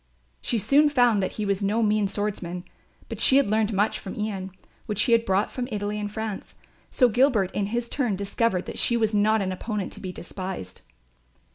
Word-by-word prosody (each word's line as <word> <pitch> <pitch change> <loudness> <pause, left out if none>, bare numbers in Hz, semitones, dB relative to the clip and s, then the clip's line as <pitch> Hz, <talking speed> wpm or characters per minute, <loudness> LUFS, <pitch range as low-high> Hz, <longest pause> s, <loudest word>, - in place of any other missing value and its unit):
She 235 - 0
soon 285 +8 +4
found 245 -7 +3
that 190 - -2
he 215 - -3
was 200 0 0
no 210 +3 +1
mean 210 -1 +2
swordsman; 195 -4 -3 0.4
but - - -6
she 270 - +5
had 275 -7 +2
learned 215 0 +2
much 210 +1 +1
from 190 - -7
Ian, 200 -3 -3 0.4
which 210 -1 +1
he - - 0
had 230 0 +4
brought 195 +2 +1
from 250 -1 -4
Italy 210 0 -2
and 205 0 -4
France; 220 -2 -5 0.3
so 250 - +4
Gilbert 240 -5 +2
in 200 -1 -1
his 235 +3 -2
turn 245 -6 0
discovered 200 0 -1
that - - -6
she 235 - +2
was 220 -1 +1
not 210 0 +3
an 190 - -2
opponent 205 +1 -4
to - - -7
be 185 - -5
despised. 180 - -7
210 Hz, 205 wpm, -25 LUFS, 195-230 Hz, 0.4 s, she